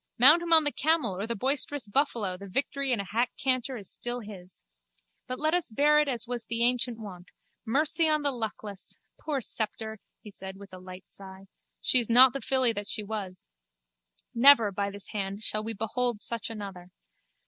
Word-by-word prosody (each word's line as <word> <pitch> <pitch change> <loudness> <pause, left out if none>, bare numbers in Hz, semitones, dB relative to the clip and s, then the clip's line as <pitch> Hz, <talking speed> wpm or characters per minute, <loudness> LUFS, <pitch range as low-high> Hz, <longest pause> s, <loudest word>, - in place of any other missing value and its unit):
Mount 300 +8 +8
him 340 -1 -5
on 320 -1 +8
the 290 - +1
camel 290 - 0
or 200 +4 -4
the 235 - -3
boisterous 270 +1 -1
buffalo 210 -5 -1
the 200 +2 -10
victory 275 +5 -1
in 235 - +1
a - - -2
hack 235 +5 -1
canter 255 0 -1
is 200 -4 -10
still 245 0 -4
his. 190 -4 -10 0.6
But 255 - -5
let 310 +1 +1
us 355 -4 0
bear 295 +6 +3
it 300 - +1
as 245 -4 -1
was 240 -1 -4
the 230 0 -1
ancient 245 -1 +1
wont. 185 -5 -10 0.4
Mercy 310 +6 +2
on 305 -1 +1
the 285 - +2
luckless! 215 -4 -7 0.2
Poor 290 -4 -3
Sceptre! 220 -1 -4 0.2
he 210 - -11
said 190 0 -9
with 200 -1 -14
a 185 - -9
light 185 0 -11
sigh. 190 0 -8 0.4
She 255 - +6
is 235 - -3
not 250 +2 +7
the 275 - -5
filly 260 -3 +2
that 205 -1 -6
she 215 - -3
was. 200 -4 -6 0.9
Never, 235 -3 +7
by 200 +1 -2
this 200 0 -8
hand, 200 0 -4
shall 215 0 +2
we 225 +1 -4
behold 225 +2 -1
such 230 +1 -4
another. 200 -5 -8
230 Hz, 195 wpm, -27 LUFS, 200-265 Hz, 0.9 s, Mount